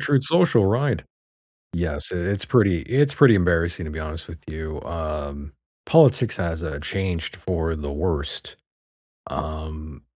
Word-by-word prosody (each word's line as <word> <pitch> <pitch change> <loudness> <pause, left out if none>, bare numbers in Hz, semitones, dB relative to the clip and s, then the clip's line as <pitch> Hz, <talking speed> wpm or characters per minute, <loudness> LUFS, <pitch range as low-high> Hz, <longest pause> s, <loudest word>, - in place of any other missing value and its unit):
Truth 135 -2 +2
Social, 155 - +4
right, 120 +4 +1 0.7
yes, 80 -3 -2
i - - -3
it's 95 +3 -1
pretty 100 -9 +3
it's 140 +3 +2
pretty 135 -7 +7
embarrassing, 85 -1 +1
to 75 - -6
be 80 - -6
honest 80 +1 -6
with 80 -1 -10
you, 80 -1 -6
um, 75 -3 -5 0.3
politics 135 -7 +5
has, 85 -2 -3
uh, 80 -3 -4
changed 90 +1 -3
for 85 -3 -2
the 75 -2 -5
worst. 75 -1 -3 0.7
Um, 80 -1 -6
85 Hz, 140 wpm, -23 LUFS, 80-100 Hz, 0.7 s, pretty